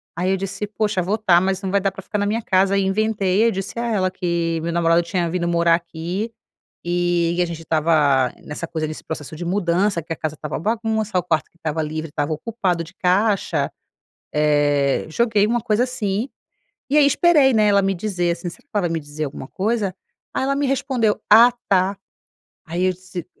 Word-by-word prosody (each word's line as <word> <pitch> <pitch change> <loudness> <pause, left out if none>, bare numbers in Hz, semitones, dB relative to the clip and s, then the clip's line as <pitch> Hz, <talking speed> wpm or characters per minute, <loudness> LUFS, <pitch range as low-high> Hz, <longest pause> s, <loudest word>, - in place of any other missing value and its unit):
Aí 180 +1 -1
eu 190 - +2
disse: 195 +2 -4
"Poxa, 210 -2 -1
vou 190 +4 0
estar 190 -5 +4
mas 190 +1 -1
não 190 - -2
vai 200 0 +2
dar 195 - +1
para 195 0 -10
ficar 210 - -3
na 205 - 0
minha 220 +2 -1
casa". 190 +1 +2
Ai 195 - +3
inventei, 200 0 +1
eu - - +4
disse 195 +4 -5
a 235 - -1
ela 185 -3 +1
que 170 -2 -1
meu 170 +1 -2
namorado 170 0 +3
tinha 175 0 -1
vindo 175 -1 -1
morar 170 0 +3
aqui, 175 +6 -3 0.5
e 175 0 +1
a - - +3
gente 170 -1 -6
estava 150 -5 +2
nessa 150 +3 -5
coisa, 160 -1 -3
nesse 155 - -7
processo 155 -1 -6
de 175 - -6
mudança 180 0 +1
que 165 - -4
a - - -6
casa 155 -1 -4
estava 150 0 -5
bagunça, 220 0 -1
o 180 - +1
quarto 160 -4 0
que - - -32
estava 160 -1 -2
livre, 155 +1 -4
estava 145 +1 -2
ocupado 180 -1 -2
de 165 - -14
caixa. 195 +3 +1 0.6
Eh, 145 -2 +2
joguei 210 +3 +2
uma 240 +1 +1
coisa 220 0 +1
assim, 225 -2 -2 0.6
e 285 - +1
aí 300 - +7
esperei, 290 -2 +4
né, 215 -2 +3
ela 200 -1 +4
me 195 0 +1
dizer, 180 -2 -1
assim 170 +1 -5
"Será 175 - -11
que 215 - -1
ela 180 -4 +1
me 165 -1 -2
dizer 150 +1 -5
alguma 135 -1 -7
coisa?". 205 -1 -1 0.4
Aí - - 0
ela 275 +1 +1
me 285 - 0
respondeu: 260 -5 0
"Ah, 230 +3 +9 0.2
tá". 190 +1 +2 0.7
Aí 170 +2 -2
eu 185 - +2
disse 185 -2 -8
185 Hz, 210 wpm, -21 LUFS, 165-210 Hz, 0.7 s, Ah